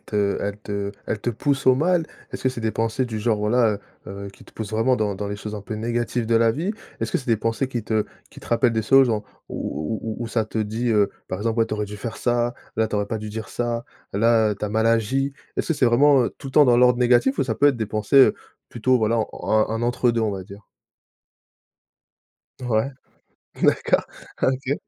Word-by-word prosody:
te 100 -1 0
elles 100 0 -3
te 100 -1 -4 0.2
elles 105 - -2
te 120 - -1
poussent 135 +4 -1
au 130 - +6
mal? 170 +3 +2 0.3
Est-ce - - -6
que 130 - +3
c'est 130 -2 -5
des 110 -1 -1
pensées 115 +3 0
du 110 -3 -4
genre, 110 -1 +1
voilà, 105 0 +2 0.3
heu - - -7 0.2
heu, - - -6
qui - - -18
te - - -19
poussent 110 -1 -6
vraiment 120 +4 +2
dans 105 -2 -1
dans 100 +1 -4
les 100 - -4
choses 105 +1 -6
un 105 - -5
peu 110 - -6
négatives 120 +1 -2
de 115 - +1
la 115 0 +4
vie? 165 - -2 0.3
Est-ce - - -2
que - - +2
c'est 130 - -10
des 115 - +4
pensées 115 +4 -1
qui 120 -4 -4
te 110 -1 0 0.3
qui - - -13
te - - -13
rappellent 120 0 +3
des 110 -1 0
choses, 135 +5 +6
genre 110 -3 0 0.3
où 75 +9 -4
où 110 -1 -3
où - - -2
où - - -4
ça 115 -1 0
te 110 - -5
dit, 110 +3 -1
heu, 105 -2 +3 0.2
par 95 - -3
exemple: 115 +2 -1
«Ouais, 115 - +3
tu 110 - -3
aurais 105 0 -2
dû 105 +1 -8
faire 110 +2 -6
ça. 120 0 0 0.2
Là, 110 0 +1
tu 105 - -2
aurais 105 0 0
pas 110 - -3
dû 110 0 -6
dire 110 +1 -6
ça. 120 -1 -2 0.3
Là, 110 0 +3
tu - - -3
as - - -2
mal 110 +2 +1
agi». 125 +5 +1 0.2
Est-ce - - -2
que 165 - +2
c'est 135 - +2
vraiment, 135 +3 +5
heu, - - -4
tout 135 - -8
le 150 - +7
dans 120 -3 +5
l'ordre 125 0 +5
négatif 125 +2 +3
ou 135 - +2
ça 115 -3 -1
peut 145 +6 +4
être 140 - +1
des 110 -2 -2
pensées, 110 +5 -1
heu, 135 - +7 0.3
plutôt, 125 +2 +1
voilà, 110 +1 +1 0.3
un 110 0 +3
un 115 +1 -2
entre 120 +1 +2
deux, 115 0 0
on 110 -2 0
va 95 -1 -5
dire? 100 +3 -12 2.0
Ouais, 120 0 0 0.7
d'accord. - - +2 0.3
Ah, - - +2
OK. 135 +2 -1
115 Hz, 250 wpm, -23 LUFS, 105-125 Hz, 2.0 s, le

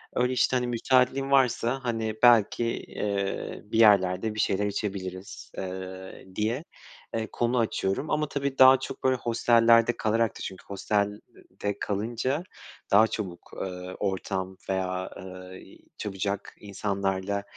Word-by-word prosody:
öyle 125 +1 +2
işte, 130 0 +2
hani, 125 0 -1
müsaitliğin 130 +3 +2
varsa, 130 -1 +3
hani, 115 -3 -2
belki, 120 -1 +5
eee, 100 -3 -3
bir 110 +2 -2
yerlerde 100 0 +4
bir 110 - -5
şeyler 100 0 +1
içebiliriz, 95 -2 -5
eee, 95 0 -7
diye, 115 +7 -1 0.5
eee, 110 -1 -2
konu 120 +1 0
açıyorum 110 +5 -1
ama 150 0 +1
tabii 140 -1 -3
daha 130 0 +8
çok - - -7
böyle 130 0 +3
hostellerde 115 0 +4
kalarak 110 0 +1
da - - -11
çünkü 95 -1 -7
hostelde 100 0 -3
kalınca 120 - -2 0.5
daha 110 +3 +7
çabuk, 95 -6 -6
eee, 90 0 -5
ortam 95 -1 -2
veya, 95 -1 -1
eee, 95 0 -11 0.2
çabucak 100 0 -3
insanlarla 100 -1 -2
105 Hz, 125 wpm, -27 LUFS, 95-120 Hz, 0.5 s, daha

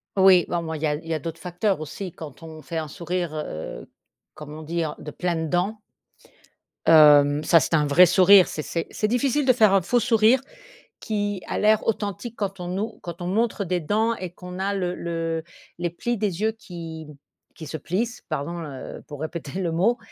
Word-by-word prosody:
Oui, 190 -2 +6
bon, 175 - -1
ben, 160 -1 -4
il 150 - -7
y - - +3
a 150 - +1
il 165 +2 -10
y 165 - -1
a - - 0
d'autres 165 +2 -6
facteurs 180 +1 -1
aussi 175 +5 -6
quand 155 -1 -11
on 160 -1 -10
fait 165 +4 -6
un 155 -1 -2
sourire, 170 +1 -3
heu, 80 - -6 0.5
comme 150 -1 -9
on 155 - -8
dit 165 +1 -2
en 150 - -4
«De - - -8
pleines 160 0 -2
dents». 195 +5 0 1.1
Hem, 150 -2 +7
ça, 165 - +6
c'est 160 - -2
un 150 -2 +3
vrai 175 +6 +7
sourire. 185 +2 +7
C'est 155 - -4
c'est 165 +2 -3
c'est 215 - -1
difficile 265 +5 +1
de 255 - +5
faire 215 -4 +4
un 195 - +5
faux 245 +8 +1
sourire 230 +2 +4 0.6
qui 205 -3 -2
a - - -3
l'air 215 0 +3
authentique 215 +1 -3
quand 195 -1 -3
on 175 -1 -5
nous 200 +5 -3
quand 170 0 -7
on 175 - -4
montre 215 +2 0
des 180 -1 -1
dents 220 +8 +1
et 185 -5 -6
qu'on 180 +1 -10
a 195 +1 -1
le 180 -2 -1
le 165 -2 -3 0.4
les 175 0 -1
plis 235 +8 -2
des 200 -4 -2
yeux 220 +1 +1
qui 165 -7 -9 0.5
qui 160 - -9
se 160 - -5
plissent, 225 +9 -3
pardon, 170 +5 -3
heu, 140 -4 -8
pour 145 -1 -9
répéter 160 +1 -5
le 170 -3 -1
mot 205 +9 +2
175 Hz, 210 wpm, -24 LUFS, 160-205 Hz, 1.1 s, Hem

